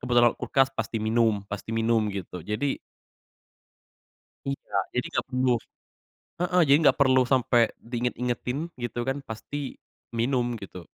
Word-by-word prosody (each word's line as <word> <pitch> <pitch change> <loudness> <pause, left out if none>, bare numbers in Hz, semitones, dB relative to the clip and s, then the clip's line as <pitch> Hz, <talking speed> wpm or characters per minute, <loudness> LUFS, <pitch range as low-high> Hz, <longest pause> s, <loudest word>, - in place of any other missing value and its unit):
kebetulan 120 -1 +4
lewat - - -24
kulkas 135 -3 +3
pasti 120 - -3
minum 110 -2 +2
pasti 100 +2 -7
minum, 115 -1 +2
gitu. 95 -3 -5
Jadi 105 - -2 1.7
Iya, 140 -6 -4 0.2
jadi 125 - 0
nggak - - 0
perlu 130 0 +2 0.9
heeh, 180 0 +3
jadi 140 +1 +7
nggak - - +5
perlu 130 -1 +6
sampe 125 -1 +3 0.2
di 120 +2 -10
inget-ingetin 125 +2 -1 0.2
gitu 120 0 -3
kan 135 - 0
pasti 110 +6 -6 0.6
minum, 120 +1 +1
gitu. 90 -2 -9
120 Hz, 135 wpm, -27 LUFS, 110-130 Hz, 1.7 s, jadi